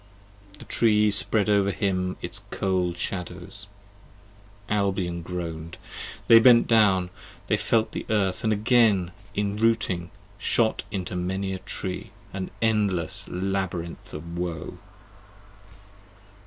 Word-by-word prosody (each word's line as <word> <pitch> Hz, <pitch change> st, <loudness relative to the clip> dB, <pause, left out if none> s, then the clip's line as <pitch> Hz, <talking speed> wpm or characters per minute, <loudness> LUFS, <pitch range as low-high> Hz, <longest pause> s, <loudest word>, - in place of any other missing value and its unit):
The -, -, -12 dB
Tree 105 Hz, -2 st, +3 dB
spread 105 Hz, 0 st, +4 dB
over 100 Hz, -1 st, +3 dB
him 90 Hz, -2 st, -1 dB
its -, -, -4 dB
cold 90 Hz, -2 st, -1 dB
shadows, 95 Hz, +2 st, -5 dB, 1.0 s
(Albion 95 Hz, -4 st, -1 dB
groan'd) 85 Hz, -2 st, -6 dB, 0.5 s
They 115 Hz, -, +9 dB
bent 115 Hz, 0 st, +7 dB
down, 95 Hz, -5 st, +4 dB, 0.3 s
they -, -, +2 dB
felt 110 Hz, -1 st, +1 dB
the -, -, -6 dB
earth 100 Hz, -4 st, 0 dB
and 110 Hz, -, +2 dB
again 110 Hz, -4 st, +3 dB, 0.2 s
enrooting 105 Hz, -4 st, 0 dB, 0.3 s
Shot 110 Hz, -2 st, +1 dB
into 95 Hz, -3 st, -4 dB
many 95 Hz, +2 st, -2 dB
a 95 Hz, -, -4 dB
Tree: 95 Hz, 0 st, -5 dB, 0.2 s
an 95 Hz, -1 st, -4 dB
endless 100 Hz, -7 st, +1 dB
labyrinth 90 Hz, -2 st, -3 dB
of 85 Hz, +3 st, -7 dB
woe! 90 Hz, -2 st, -4 dB
95 Hz, 110 wpm, -25 LUFS, 90-105 Hz, 1.0 s, They